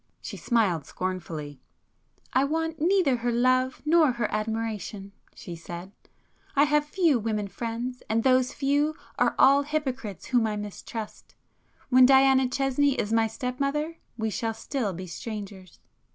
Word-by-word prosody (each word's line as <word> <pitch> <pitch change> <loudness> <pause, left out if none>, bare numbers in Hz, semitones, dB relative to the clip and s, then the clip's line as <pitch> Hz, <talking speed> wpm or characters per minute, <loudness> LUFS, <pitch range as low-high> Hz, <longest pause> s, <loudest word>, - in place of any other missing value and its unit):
She - - -7
smiled 195 - +1
scornfully. 165 -6 -5 0.7
"I 260 - +4
want 320 +2 -1
neither 340 -7 +3
her 240 +1 -1
love 255 +2 +1
nor 310 -4 +4
her 235 -3 -1
admiration,"—she 215 -4 -5
said—"I 175 - -5
have 295 0 +2
few 320 -5 +2
women 210 -2 -2
friends 235 +4 -5
and 225 +1 +1
those 255 0 +3
few 290 +2 +1 0.2
are - - +2
all 275 +1 +6
hypocrites 270 - -3
whom 240 -3 +2
I 215 - -2
mistrust. 210 +1 -7 0.5
When 255 0 +7
Diana 265 -1 +5
Chesney 275 +1 +1
is 215 -3 -2
my 225 0 +3
step 250 +3 -5
mother, 300 +4 -1 0.2
we 220 -1 -1
shall 225 0 -2
still 225 -1 -2
be 185 +1 -7
strangers." 195 -1 -8
245 Hz, 135 wpm, -26 LUFS, 210-275 Hz, 0.7 s, When